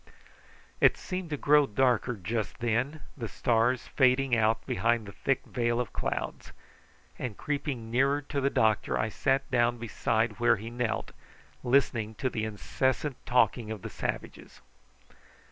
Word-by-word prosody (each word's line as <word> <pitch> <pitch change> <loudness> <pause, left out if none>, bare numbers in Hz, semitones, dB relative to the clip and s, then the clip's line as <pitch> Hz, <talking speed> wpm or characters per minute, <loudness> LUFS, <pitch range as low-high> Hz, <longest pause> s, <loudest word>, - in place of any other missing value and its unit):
It - - +5
seemed 185 -3 -5
to 150 - -2
grow 145 0 +4
darker 125 +1 +1
just 110 +3 -3
then, 120 +6 -1
the 120 -5 -5
stars 120 +3 +1
fading 130 -1 +3
out 110 0 +1
behind 115 +2 0
a - - -7
thick 135 +6 -1
veil 120 -1 0
of 125 - -3
clouds; - - -4 0.7
and 120 -5 -4
creeping 140 -6 -3
nearer 135 +4 +3
to 140 0 -3
the 140 - +2
doctor 110 -5 +2
I 110 - 0
sat 135 +5 0
down 120 -1 +2
beside 110 -1 -1
where 120 - +4
he 110 +3 -7
knelt, 120 -2 -2 0.5
listening 120 -4 +1
to 130 +3 -2
the 110 -2 -2
incessant 130 +6 -2
talking 125 -2 +2
of 110 -3 -6
the - - -6
savages. - - -5
120 Hz, 145 wpm, -29 LUFS, 110-135 Hz, 0.7 s, It